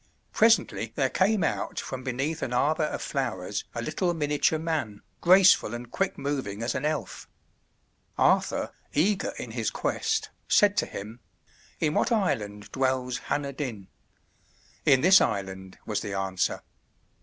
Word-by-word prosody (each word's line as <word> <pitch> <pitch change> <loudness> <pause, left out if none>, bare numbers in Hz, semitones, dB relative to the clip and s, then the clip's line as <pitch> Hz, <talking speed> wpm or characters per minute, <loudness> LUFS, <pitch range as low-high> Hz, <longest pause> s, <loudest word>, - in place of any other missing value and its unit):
Presently 115 - +3
there 135 -2 +1
came 200 0 +2
out - - -2
from 130 -1 -6
beneath 135 +6 -2
an 125 - -3
arbor 155 +5 +2
of - - -4
flowers - - -3
a - - -3
little 175 -3 -1
miniature 150 0 +1
man, 155 -11 -3 0.2
graceful 180 - +6
and 120 0 -8
quick 195 -1 -1
moving 135 -7 -3
as 120 - -1
an - - -2
elf. 155 -1 -3 0.9
Arthur, - - +2 0.2
eager 190 +7 +1
in - - -6
his - - -1
quest, 445 0 -1 0.2
said 205 -1 +4
to - - +1
him, 110 +4 -8 0.6
"In 150 -1 +1
what - - +1
island 105 - -1
dwells 130 -2 0
Hanner 140 -1 -1
Dyn?" 120 -9 -5 1.0
"In 130 - +5
this 185 +3 +7
island," 95 -1 -3
was 105 - -1
the 100 -2 -4
answer. 95 -1 -1
135 Hz, 145 wpm, -27 LUFS, 110-165 Hz, 1.0 s, this